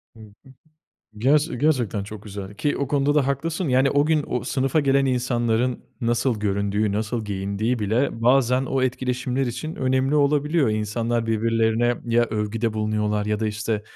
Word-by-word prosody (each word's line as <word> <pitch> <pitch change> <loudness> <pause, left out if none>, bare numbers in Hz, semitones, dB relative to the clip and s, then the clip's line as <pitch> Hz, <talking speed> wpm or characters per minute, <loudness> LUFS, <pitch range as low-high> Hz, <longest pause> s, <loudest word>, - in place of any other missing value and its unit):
Hı - - -16
hı. 110 +4 -16 0.7
Gerçe 145 +3 +2
gerçekten 120 -8 +1
çok 105 0 -9
güzel 100 -1 -8
ki 145 +7 -1
o 140 -2 -2
konuda 145 0 +1
da 140 -3 +3
haklısın, 160 +5 -2
yani 130 +2 +3
o 145 +1 +2
gün, 155 -2 +2
o 125 - -3
sınıfa 135 +3 +1
gelen 135 -1 +2
insanların, 120 -1 0 0.2
nasıl 120 -1 0
göründüğü, 100 0 0
nasıl 110 +2 -2
giyindiği 100 +4 -2
bile 115 +3 -1
bazen, 125 +1 +3
o 135 -1 0
etkileşimler 130 +1 -1
için 155 +7 -5
önemli 130 +2 +1
olabiliyor. 150 0 +2
İnsanlar, 115 +2 -1
birbirlerine 115 +1 +1
ya 120 0 +3
övgüde 110 +1 -2
bulunuyorlar 105 -1 -1
ya 105 0 -1
da 110 - 0
işte, 105 0 -2
120 Hz, 160 wpm, -23 LUFS, 110-135 Hz, 0.7 s, da